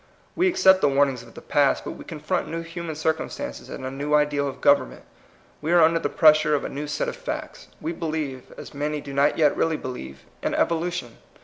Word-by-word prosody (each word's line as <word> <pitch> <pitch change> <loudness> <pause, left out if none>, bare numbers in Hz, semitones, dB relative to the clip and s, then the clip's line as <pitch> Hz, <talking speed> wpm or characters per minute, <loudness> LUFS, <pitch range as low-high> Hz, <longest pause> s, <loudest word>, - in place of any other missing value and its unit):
We 370 - +3
accept 190 - +5
the 145 - +4
warnings 135 -2 +2
of 115 -1 -16
the - - -11
past, 140 -2 +2
but - - -4
we - - -10
confront 150 -2 -3
new 165 0 -4
human 165 -1 -6
circumstances 160 +1 -3
and 130 - -7
a 130 - -4
new 145 +2 0
ideal 145 -1 +2
of 135 - -6
government. 140 0 +2 0.6
We 155 +3 -2
are 175 -2 +7
under 165 +1 +4
the - - -2
pressure 155 -1 +5
of 145 - -2
a - - -3
new 145 +2 -5
set 150 - -2
of - - -3
facts. - - -6
We 160 - -3
believe, 155 -6 -4
as - - -10
many 150 +1 -2
do 140 -1 -8
not 140 +2 +2
yet 150 -3 +4
really 160 -1 +1
be 130 - -6
lieve, 65 - -9 0.2
in - - -1
evolution. 170 -7 -1
150 Hz, 220 wpm, -24 LUFS, 140-165 Hz, 0.6 s, are